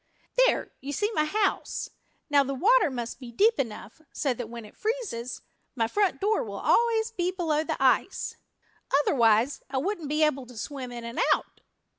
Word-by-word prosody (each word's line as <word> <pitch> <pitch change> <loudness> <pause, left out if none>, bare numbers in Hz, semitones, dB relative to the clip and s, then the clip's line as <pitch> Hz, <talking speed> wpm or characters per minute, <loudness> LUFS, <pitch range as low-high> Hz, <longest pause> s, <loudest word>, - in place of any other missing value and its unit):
"There, - - 0
you 280 +2 -5
see 415 +7 0
my 305 -6 +2
house. 405 +5 -1 0.4
Now 285 -2 +4
the 275 0 -3
water 440 - +4
must 240 -2 -5
be 250 -3 -9
deep 435 - +3
enough 230 +2 -5
so 275 -4 0
that 240 -2 -6
when 235 -1 -8
it 210 - -15
freezes 425 - -3 0.3
my 230 -3 +1
front 405 - +1
door 435 +4 +1
will - - -7
always 460 -1 +2
be 360 -5 -1
below 325 -5 0
the - - -3
ice. - - +2 0.7
Otherwise 235 -1 +3
I 270 - -2
wouldn't 335 0 -2
be 305 +1 +2
able 275 -4 +1
to 245 -2 -13
swim 260 +1 -5
in 240 -1 -7
and 235 +1 -5 0.2
out." - - -11
290 Hz, 180 wpm, -27 LUFS, 245-405 Hz, 0.7 s, Now